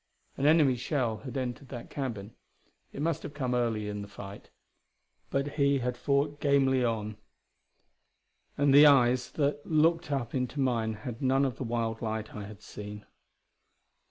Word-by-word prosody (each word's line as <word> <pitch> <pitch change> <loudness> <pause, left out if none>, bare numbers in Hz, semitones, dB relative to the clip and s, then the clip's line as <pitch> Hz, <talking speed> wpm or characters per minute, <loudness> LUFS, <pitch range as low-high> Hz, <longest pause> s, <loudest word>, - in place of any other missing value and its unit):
An 140 - +1
enemy 150 -5 +5
shell 120 -3 -1
had 135 +2 -7
entered 130 +1 -4
that 120 -3 -8
cabin; 115 -7 -4 0.6
it 140 - -5
must 160 -1 0
have 145 -1 -8
come 130 -4 -1
early 115 -4 0
in 105 0 -4
the 100 - -7
fight, 100 0 -10 0.8
but 140 +1 0
he 140 -1 +2
had 125 -1 -2
fought 140 +3 0
gamely 135 -3 +3
on. 110 -3 -2 1.4
And 145 -1 +3
the 145 +2 +9
eyes 125 -3 +4
that 145 -1 0
looked 165 0 +2
up 130 -4 -2
into 130 +2 -2
mine 115 -4 0
had 115 +3 -7
none 135 +1 +3
of 130 -2 -3
the - - -4
wild 115 -1 -2
light 110 -1 -3
I 105 -1 -6
had 105 0 -12
seen. 105 0 -9
130 Hz, 160 wpm, -29 LUFS, 115-140 Hz, 1.4 s, the